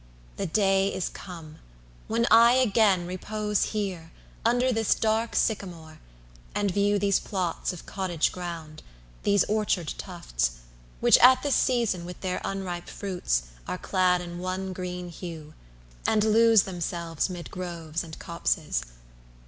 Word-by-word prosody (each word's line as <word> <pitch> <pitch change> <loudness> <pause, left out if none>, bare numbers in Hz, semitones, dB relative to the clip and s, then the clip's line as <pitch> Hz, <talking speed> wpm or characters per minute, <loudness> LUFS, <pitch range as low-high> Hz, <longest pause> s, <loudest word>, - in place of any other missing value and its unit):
The - - -2
day 195 +1 +2
is 185 - -2
come 165 -4 -10 0.5
when 230 +1 +1
I 235 +1 +8
again 215 -7 +3
repose 210 +3 -1
Here, 185 -6 -4 0.3
under 245 +3 +3
this 225 -2 +2
dark 225 +1 0
sycamore, 170 -7 -2 0.6
and 205 -1 +1
view 205 +2 +2
10 - - +1
These 200 -1 +3
plots 185 -4 -2
of 180 - -10
cottage 185 -5 -1
ground, 165 -4 -7 0.4
these 200 -2 +3
orchard 205 -7 0
tufts, - - -2 0.5
Which - - +6
at 255 +1 +7
this 285 -2 +1
season, 230 -9 +1
with 180 +1 -8
their 185 -1 -2
unripe 185 -3 -4
fruits, 180 - -1 0.2
Are - - -2
clad 180 -1 +2
in 175 0 -7
one 185 +1 -3
green 180 -1 -5
hue, 165 -3 -8 0.5
and 215 -1 +3
lose 225 -1 +5
themselves 170 -2 -3
'Mid 175 -2 -7
groves 170 -3 -4
and 160 -2 -9
copses. - - -1
185 Hz, 140 wpm, -27 LUFS, 170-210 Hz, 0.6 s, I